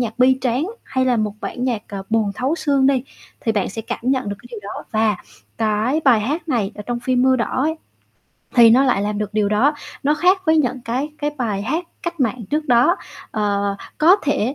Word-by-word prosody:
nhạc 230 0 -3
bi 260 +1 +5
tráng, 255 +5 0 0.2
hay 260 0 0
là 250 -2 +2
một 210 -1 -1
bản 250 - -4
nhạc, 235 -5 -1
à, 195 -1 -5
buồn 220 -2 +2
thấu 265 +5 0
xương 280 -5 +2
đi, 270 -2 +2 0.4
thì 225 - 0
bạn 205 -3 0
sẽ 225 +3 -6
cảm - - -4
nhận 255 -3 0
được 200 - -4
cái 240 - -15
điều 225 -4 -7
đó. 200 - -7
Và 215 -3 +2 0.4
cái 220 +6 +1
bài 240 -6 +5
hát 305 +8 -3
này 225 -6 0
ở 210 - -7
trong 240 -1 -2
phim 250 0 +1
Mưa 260 0 +4
Đỏ 255 +2 -1
ấy 320 +2 0 0.8
thì 235 -2 +8
nó 260 +4 +5
lại 240 -6 +2
làm 210 0 -2
được 210 0 -4
điều 210 -2 +2
đó, 260 +9 +3 0.3
nó 295 +2 +3
khác 370 +4 +3
với 315 0 +4
những 255 -4 +1
cái 255 +6 -2
cái 295 0 -1
bài 210 -5 -1
hát 320 +11 -1 0.2
cách 340 -3 -4
mạng 240 -1 0
trước 300 +1 0
đó. 245 +8 +4 0.3
Ờ, 200 -2 0 0.2
có 345 +6 +6
thể 275 -3 0
245 Hz, 225 wpm, -20 LUFS, 215-275 Hz, 0.8 s, thì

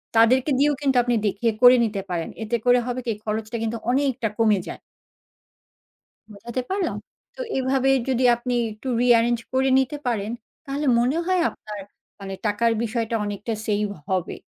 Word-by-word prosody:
তাদেরকে 250 +5 +4
দিয়েও 290 +1 +3
কিন্তু 270 -3 +2
আপনি 240 0 +1
দেখিয়ে 220 +3 0
করে 250 0 +9
নিতে 205 -3 -3
পারেন। 170 -2 -3
এতে 230 +2 -1
করে 245 0 +5
হবে 250 0 -2
কি? - - -2
এই 210 - -12
খরচটা 220 +2 -3
কিন্তু 225 +1 -2
অনেকটা 260 -4 0
কমে 215 -3 +4
যায়। - - -7 1.5
বোঝাতে 235 +5 -5
পারলাম? 385 -1 -1 0.4
তো - - -12 0.2
এভাবে 265 0 +1 0.2
যদি 260 -1 +1
আপনি 245 +1 -3 0.2
একটু 215 +5 -8
রি-এরেঞ্জ 240 -1 +4
করে 265 +1 +2
নিতে 265 +2 0
পারেন, 220 -3 -1 0.3
তাহলে 285 +1 -3
মনে 250 +5 +1
হয় 370 -1 +2
আপনার 210 -1 -9 0.4
মানে 195 -1 -6
টাকার 230 +3 +2
বিষয়টা 230 0 -2
অনেকটা 205 +2 -4
সেইভ 210 -1 +1 0.2
হবে। 185 -2 -1
235 Hz, 160 wpm, -23 LUFS, 215-260 Hz, 1.5 s, করে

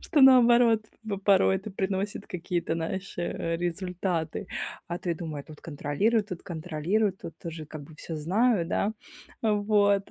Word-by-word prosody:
Что 305 - +1
наоборот 240 -4 +7 0.2
в 210 -2 -2
порой 190 -1 +4
это 195 +3 -7
приносит 195 +1 -2
какие-то, 175 -2 -2
знаешь, 185 +4 -4
э, 165 -1 -2
результаты. 175 -1 -2 0.4
А, 175 +1 -3
ты 175 -2 -2
думай: 155 -3 -5
"Тут 155 -1 -13
контролируй, 165 +9 +1
тут 185 -4 -7
контролируй, 180 +5 0
тут 165 -4 -9
тоже 165 -2 -6
как 150 0 -8
бы 155 +2 -13
всё 160 0 -6
знаю, 190 +4 +2
да?" 200 +4 0 0.5
Вот. 205 -2 +3
185 Hz, 150 wpm, -28 LUFS, 165-210 Hz, 0.5 s, наоборот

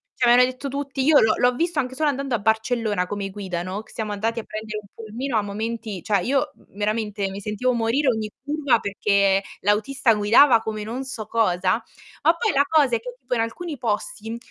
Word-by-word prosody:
cioè 245 -2 +3
me 240 - +7
l'hanno 250 +1 +5
detto 255 +2 -7
tutti, 275 0 -3
io 295 +1 +6
l'ho 220 -1 +4
l'ho 245 0 +3
visto 330 +1 0
anche 260 -1 -2
solo 305 +2 +1
andando 275 -2 -1
a 225 - -1
Barcellona, 220 -3 0
come 200 0 -4
guida, 190 -3 -4
no, 185 +4 -4
che - - -19
siamo 215 -2 -4
andati 225 +3 -1
a - - -6
prendere 215 0 -6
un 200 - -19
pulmino 230 +3 -4
a - - +3
momenti 215 -1 -4
cioè 200 -3 +1
io 275 +6 0 0.2
veramente 210 -1 -2
mi 195 +1 -6
sentivo 210 +5 -1
morire 235 +5 +1
ogni 220 -3 -1
curva 285 -4 +1
perché 200 -1 +2 0.2
l'autista 220 +5 +2
guidava 225 +5 +6
come 215 -1 -4
non 240 +5 -5
so 235 -5 -6
cosa, 190 -2 +1 0.4
ma - - +5
poi 455 -3 0
la 280 0 +4
cosa 290 -6 +3
è - - 0
che 245 +2 -8
tipo 250 -1 -5
in - - -1
alcuni 295 +8 -4
posti, 225 -1 -3
225 Hz, 210 wpm, -23 LUFS, 210-260 Hz, 0.4 s, me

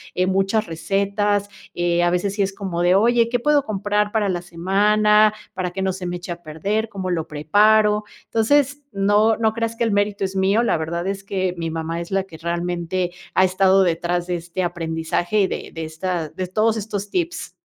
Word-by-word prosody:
eh, 180 - +2
muchas 195 +3 +1
recetas, 200 +4 0 0.2
eh, 175 0 +1
a 175 - +3
veces 190 +3 0
sí 205 - 0
es 195 - -2
como 190 -4 -4
de, 175 +1 +4
oye, 235 +2 +3
¿qué 245 - 0
puedo 290 +3 +3
comprar 210 -1 0
para 215 -2 +1
la 175 -1 -1
semana, 210 +5 +3 0.2
para 180 -1 -3
que 190 - -4
no 190 -1 0
se 185 -1 -6
me 175 - -3
eche 175 0 -8
a 170 0 -6
perder? 200 +8 -2
¿Cómo 190 -3 -4
lo 160 -2 -2
preparo? 210 +7 +3 0.2
Entonces, 285 +5 +2
no 205 +2 +3
no 220 -1 +1
creas 230 0 -2
que 235 - -1
el 225 - +1
mérito 205 0 0
es 190 0 -3
mío, 195 +4 +2
la 235 - +2
verdad 170 +3 -3
es 195 0 -3
que 190 -2 -1
mi 165 -1 -3
mamá 165 +1 -3
es 170 - -7
la 195 0 +1
que 165 -4 -13
realmente 175 +1 -2 0.2
ha 185 - +5
estado 190 +1 +4
detrás 175 0 -1
de 180 - -1
este 175 +2 -4
aprendizaje 170 +3 -1
y 190 - +3
de - - -6
de 165 -1 -5
esta 160 0 -3
de 185 -1 -5
todos 215 +4 +1
estos 205 -1 -4
tips. 340 -2 -3
190 Hz, 205 wpm, -21 LUFS, 175-210 Hz, 0.2 s, ha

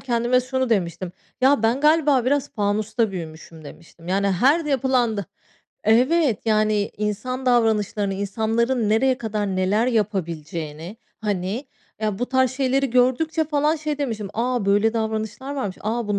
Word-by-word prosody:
kendime 240 0 +1
şunu 260 0 -2
demiştim. 180 -3 -1 0.3
Ya 270 -2 +4
ben 235 +5 +2
galiba 300 -4 +3
biraz 285 +1 0
fanusta 215 +1 0
büyümüşüm 160 -2 -9
demiştim. 165 +3 -13
Yani, 195 +2 +1
her 275 - +3
yapılanda 255 -7 +1 0.6
Evet 255 - +3
yani 215 -1 +2
insan 255 +5 -3
davranışlarını, 215 -4 +1
insanların 220 +4 0
nereye 255 +4 +2
kadar 215 -3 -2
neler 205 +5 +1
yapabileceğini, 170 -5 -3 0.2
hani, 205 +5 -2 0.3
ya, 210 -3 -1
bu 245 - -1
tarz 260 -1 +2
şeyleri 270 0 0
gördükçe 260 +6 +2
falan 300 +1 +1
şey 300 -1 -3
demiştim, 220 -8 -3
"A! 240 -2 -1
böyle 205 +3 +3
davranışlar 220 +4 -3
varmış. 205 -9 -3
A! 225 +1 -2
Bu 205 -1 0
225 Hz, 135 wpm, -22 LUFS, 205-260 Hz, 0.6 s, Ya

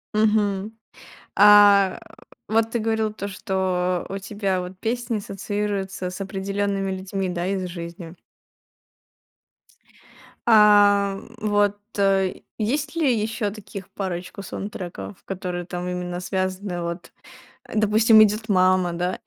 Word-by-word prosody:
Мгм, 210 -1 +1 0.6
а, 205 -2 +7
э, - - -18 0.2
вот 225 0 +2
ты 235 - -1
говорил 220 -1 0
то, 200 -2 -6
что 185 -3 -1
у 195 - -4
тебя 195 -1 -2
вот 180 +1 -8
песни 235 +2 -2
ассоциируются 195 -2 -3
с 180 - -9
определёнными 195 0 -2
людьми, 190 0 -3
да, 175 0 -2
из 190 -1 -1
жизни? 170 -1 -8 2.3
А, 205 -2 +5
м, - - -13
вот, 205 -1 +1 0.2
э, 195 -1 +2 0.2
есть 285 +8 -1
ли 305 -6 +2
ещё 215 0 -2
таких 200 -2 -9
парочку 185 0 -5
саундтреков, 175 - -7
которые 180 -2 -4
там 180 0 -5
именно 180 0 -4
связаны, 185 0 -3
вот, 170 +1 -5 0.5
а, - - -12
допустим, 220 +1 +5
идёт 215 +1 +2
мама, 185 -2 +3
да, 180 +2 -2
195 Hz, 120 wpm, -23 LUFS, 185-210 Hz, 2.3 s, а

